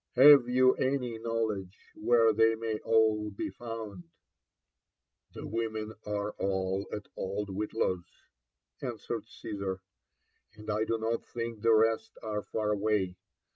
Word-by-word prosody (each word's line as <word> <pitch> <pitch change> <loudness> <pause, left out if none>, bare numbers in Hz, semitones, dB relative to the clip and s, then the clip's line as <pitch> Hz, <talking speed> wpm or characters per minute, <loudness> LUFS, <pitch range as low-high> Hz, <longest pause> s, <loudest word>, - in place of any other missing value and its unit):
Have 135 -1 +9
you 130 +1 +5
any 130 -4 -1
knowledge 110 -5 -3
whers 115 0 +4
they 115 +1 +4
may 110 -1 -3
all 110 -1 +2
be 100 - -4
found? 110 -6 -7 0.6
" - - -46
The - - -6
women 110 0 -3
are 105 0 -2
all 95 0 -1
at 105 - -5
old 100 +2 -3
Whitlaw's,'' 95 -2 -3 0.6
answered - - -4
Caesar; 95 -2 -5 0.3
— - - -49
'* - - -43
and 105 0 -6
I 105 +1 +1
do 115 - 0
not 115 +1 -2
thiqk 115 -2 -5
the 115 0 +5
rest 110 0 +2
are 105 -1 -2
far 105 0 -2
away. 100 -3 0
110 Hz, 140 wpm, -30 LUFS, 105-115 Hz, 0.6 s, Have